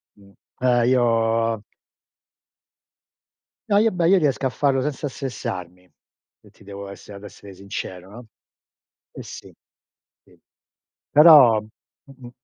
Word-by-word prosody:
Mh. 100 -1 -21 0.3
E 120 -1 +2
io 115 -3 +1 2.1
No, 200 - +3
io 225 +1 +2
beh, 175 -2 0
io 190 - +4
Io 195 - +5
riesco 140 -4 -1
a - - +1
farlo 135 +1 0
senza 145 +1 -4
stressarmi 90 -9 -7 0.5
e - - -20
ti - - -22
devo 100 0 -10
a - - -9
esse 100 +1 -14
ad 100 0 -11
essere 100 0 -13
sincero, 95 -1 -8
no. 120 +4 -12 0.9
E - - -10
sì. - - -12 0.7
Sì. - - -25 0.7
Però, 145 -8 +7
m 110 0 -17 0.5
m 120 -2 -11
115 Hz, 135 wpm, -21 LUFS, 100-135 Hz, 2.1 s, Però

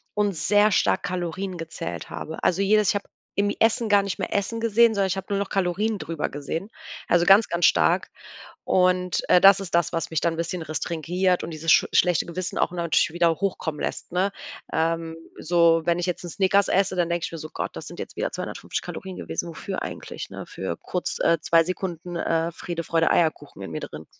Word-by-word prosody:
und 205 -2 +1
sehr 205 +5 +3
stark 195 - +2
Kalorien 185 0 -3
gezählt 165 0 -6
habe. 160 - -7
Also 180 +2 +2
jedes 210 0 +3
ich - - +2
habe 200 - -3 0.3
im 205 0 +2
Essen 225 0 +2
gar 205 -1 +5
nicht 200 -1 -4
mehr - - -3
Essen 215 +3 -1
gesehen, 230 0 +4
sondern 200 -1 +2
ich 190 - -1
habe 190 - -5
nur 200 - +1
noch 200 - -3
Kalorien 195 +3 0
drüber 165 -4 -3
gesehen, 160 +7 -5 0.4
also 175 0 +4
ganz, 200 +4 +6
ganz 170 -1 +2
stark. 80 -2 +3 0.6
Und, 180 -1 +2
äh, 180 - +6
das, 195 0 +7
ist 190 -3 -7
das, 170 - +1
was 165 -1 -2
mich 160 - 0
dann 170 -1 0
'n - - -7
bisschen 170 +1 -3
restringiert 170 +4 -1
und - - -6
dieses 160 +1 -1
schu - - +6
schlechte 180 -2 +3
Gewissen 180 +1 -4
auch - - +1
natürlich 170 -2 +1
wieder 170 -1 +3
hochkommen 170 -6 -2
lässt, - - -4
ne? 185 +3 0 0.4
Ähm, 165 0 -1 0.2
so, 165 0 +3
wenn 175 0 +1
ich 175 - -1
jetzt 180 0 -3
'n - - -5
Snickers 200 +2 +3
esse, 190 -1 +1
dann 175 -1 +1
denke 170 -1 -1
ich - - -8
mir 165 - -6
so: 155 - -7
„Gott, - - -4
das - - -7
sind - - -9
jetzt - - -7
wieder - - -2
250 - - -4
Kalorien 190 -1 -7
gewesen, 175 - -4
wofür 185 +3 -5
eigentlich, - - -7
ne, - - -7
für 90 -3 -5
kurz, 180 - -4
äh, 170 - +3
2 165 0 +4
Sekunden, 175 0 -5
äh, 165 0 0
Friede, 170 0 -5
Freude, 165 0 +2
Eierkuchen 160 -2 0
in - - -7
mir - - -4
drin.“ 75 +1 -8
175 Hz, 215 wpm, -24 LUFS, 165-195 Hz, 0.6 s, das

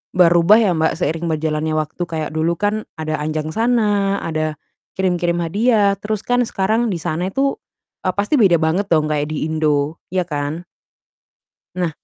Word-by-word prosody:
berubah 175 +3 +6
ya 215 -5 +3
Mbak, 160 0 +1
seiring 165 0 -1
berjalannya 155 0 -1
waktu 155 +3 -4
kayak 155 -2 -3
dulu 165 +1 0
kan 210 +1 0 0.2
ada 155 -1 -3
anjangsana, 200 +6 0
ada 155 -2 -2 0.4
kirim-kirim 175 -2 0
hadiah, 205 +3 +2
terus 215 0 -3
kan 245 0 +2
sekarang 220 +5 0
di 180 - -1
sana 175 +3 -2
itu, 275 +6 -1 0.4
eee, 185 - -1
pasti 220 +6 +2
beda 175 -4 +5
banget 170 +6 0
dong 155 -2 +3
kayak 150 0 -1
di 155 0 -2
Indo, 155 -1 0
ya 180 -1 0
kan? 150 +2 -4 1.1
Nah. 180 -3 -1
170 Hz, 155 wpm, -19 LUFS, 155-200 Hz, 1.1 s, berubah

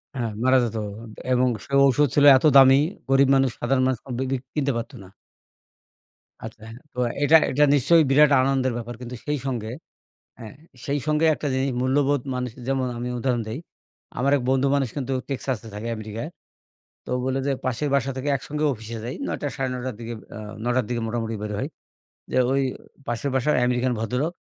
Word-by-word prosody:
হ্যাঁ, 120 -4 -2
মারা 130 +1 +5
যেত 115 -1 -3 0.6
এবং 125 0 +3 0.2
সে 140 - -11
ঔষধ 145 +2 +4
ছিল 145 - +5
এত 135 - -2
দামি, 135 0 +8 0.3
গরিব 135 0 +5
মানুষ, 135 -1 +3
সাধারণ 130 +2 +1
মানুষ 130 -3 0
কমপ্লিটলি 130 +1 -2 0.2
কিনতে 140 -2 0
পারত 115 +5 -5
না। - - -13 1.3
আচ্ছা, 110 -1 -9
হ্যাঁ। 115 - -10 0.2
তো 125 - -6 0.2
এটা, 160 +3 +7
এটা 150 +3 +3
নিশ্চয়ই 160 +4 +5
বিরাট 145 +1 +5
আনন্দের 130 -2 +1
ব্যাপার। 120 0 -6
কিন্তু 125 0 -7
সেই 150 0 -1
সঙ্গে, 115 -4 -3 0.7
হ্যাঁ, 110 -2 -10 0.3
সেই 145 +1 0
সঙ্গে 155 +1 +2
একটা 145 - -5
জিনিস, 135 +1 0
মূল্যবোধ 140 +1 +2
মানুষের 125 -1 -5
যেমন 135 -1 0
আমি 120 - -3
উদাহরণ 120 -2 0
দেই। 115 - -4 0.6
আমার 135 +2 +2
এক 125 - -5
বন্ধু 135 +1 +2
মানুষ 135 -2 +1
কিন্তু 135 -1 -3 0.2
Texas 130 -2 -2
এ - - -8
থাকে 105 +3 -5
আমেরিকায়। 110 +6 -6 0.8
তো - - -14
ও - - 0
বলে 130 +1 0
যে, 140 - +2
"পাশের 130 +4 -1
বাসা 135 0 0
থেকে 140 +3 -2
একসঙ্গে 150 +3 -4
অফিসে 115 0 -8
যাই। 125 +3 -5
নয়টা 145 - -3
সাড়ে 135 0 -2
নয়টার 125 -2 -4
দিকে, 115 0 -6 0.2
আ - - -7 0.2
নয়টার 125 -1 +1
দিকে 120 -1 -2
মোটামুটি 115 -1 -3
বের 105 0 -4
হই। 135 - -2 0.6
যে - - 0
ওই 135 - +2 0.5
পাশের 120 +4 -2
বাসার 140 +4 +2
আমেরিকান 125 0 +1
ভদ্রলোক, 125 +9 -1
130 Hz, 185 wpm, -24 LUFS, 120-140 Hz, 1.3 s, দামি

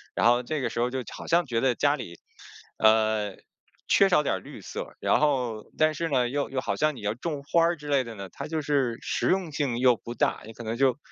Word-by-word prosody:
然 - - +1
后 120 +1 +5
这 150 +4 -3
个 - - -1
时 - - -4
候 120 +1 +2
就 130 0 -3
好 - - -9
像 175 +1 +3
觉 115 -3 -1
得 130 -2 +2
家 145 +3 +2
里， 85 - -8 0.6
呃 110 -2 +3 0.5
缺 195 - +5
少 165 -5 +4
点 - - 0
儿 95 - -4
绿 - - -11
色。 - - -7
然 - - +2
后 125 -7 0
但 155 0 +3
是 165 +2 -2
呢， 125 -4 +2
又 140 +3 -2
又 135 - -2
好 - - -2
像 155 -1 +1
你 120 - -10
要 105 +1 -1
种 140 +4 -5
花 170 +4 +2
儿 170 +1 +2
之 150 0 -10
类 140 -2 +2
的 115 -2 -8
呢， 100 -2 -8
它 - - -7
就 160 0 -2
是 135 -5 +1
实 - - -1
用 185 -4 +1
性 140 -5 -1
又 125 0 +5
不 120 +1 -8
大， - - 0
你 110 - -10
可 120 - -9
能 110 0 -3
就 130 +1 +2
130 Hz, 275 characters per minute, -27 LUFS, 115-150 Hz, 0.6 s, 后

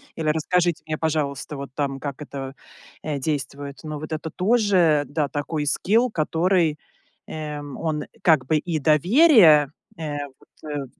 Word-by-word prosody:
Или: 160 -2 -1
"Расскажите 170 +2 0
мне, 155 -1 -3
пожалуйста, 150 -2 -2
вот 140 -1 -7
там 140 -2 -2
как 140 0 -6
это, 135 -2 -7 0.5
э, 150 -2 -2
действует". 140 0 -4
Но 155 -1 -5
вот 155 +2 -8
это 155 +1 -4
тоже, 185 -7 +3
да, 150 0 -1
такой 145 +2 -3
скилл, 220 - +2
который, 165 -2 +1 0.5
эм, 150 -2 -6
он 155 -2 -2 0.2
как 155 -6 +4
бы 155 +4 +2
и 160 +1 -2
доверие, 160 - +5 0.3
э, 150 -3 -4 0.2
вот, 155 - -14
э, 145 -2 -3
155 Hz, 145 wpm, -23 LUFS, 145-165 Hz, 0.5 s, доверие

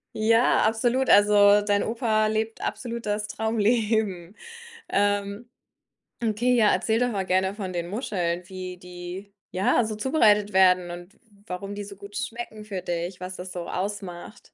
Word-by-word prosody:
Ja, 230 +3 +3
absolut. 240 +4 +1
Also, 205 0 +6
dein 205 -1 +2
Opa 220 -2 +1
lebt 220 +1 -2
absolut 235 -2 -4
das 210 0 -1
Traumleben. 220 -4 0 0.5
Ähm, 205 +3 0 0.7
okay, 230 +3 +2
ja, 220 -3 +5
erzähl 220 0 +1
doch 245 0 +2
mal 195 -3 -2
gerne 190 +1 +1
von 190 -4 -5
den 170 0 -3
Muscheln, 180 -6 -2
wie 185 -1 -7
die, 180 +2 -9 0.2
ja, 195 +6 +2
so 215 -1 -4
zubereitet 210 -6 +3
werden 180 -2 +4
und 175 +3 -9
w - - -31 0.3
warum 195 +2 -5
die 205 - -5
so 200 0 -10
gut 200 0 -12
schmecken 225 -2 -5
für 195 -4 -5
dich, 175 +1 -4
was 185 0 -6
das 180 0 -7
so 175 -1 -6
ausmacht. 195 +1 -5
205 Hz, 155 wpm, -25 LUFS, 185-220 Hz, 0.7 s, Also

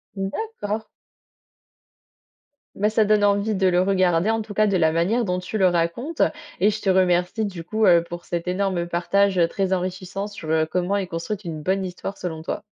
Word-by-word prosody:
D'accord. 210 - -3 1.9
Bah, 210 +2 +1
ça 220 0 +2
donne 210 0 +3
envie 205 +1 +2
de 190 -1 +2
le 180 0 +3
regarder, 185 0 +2
en 225 0 0
tout 210 -1 -9
cas, 215 - +4
de 200 -2 +2
la 160 -2 +3
manière 190 +9 +1
dont 180 -2 -1
tu 180 +4 -4
le 190 - +5
racontes, 175 - -1
heu, - - +5 0.3
et 205 +3 +4
je 215 +1 -5
te 195 - 0
remercie 185 +3 +2
du 185 -5 -6
coup, 215 +6 0
heu, 170 -3 +6
pour 175 0 -8
cet 170 0 -4
énorme 185 -2 -1
partage, 190 +3 +1
heu, 170 -1 +4
très 190 +2 -1
enrichissant 185 +2 -3
sur, 205 -6 -8
heu, 160 0 +2
comment 180 +4 -1
est 195 - -1
construite 185 +5 -4
une 160 -2 -5
bonne 190 +4 0
histoire 185 +2 -6
selon 160 -3 -5
toi. 160 - -4
190 Hz, 200 wpm, -23 LUFS, 175-205 Hz, 1.9 s, heu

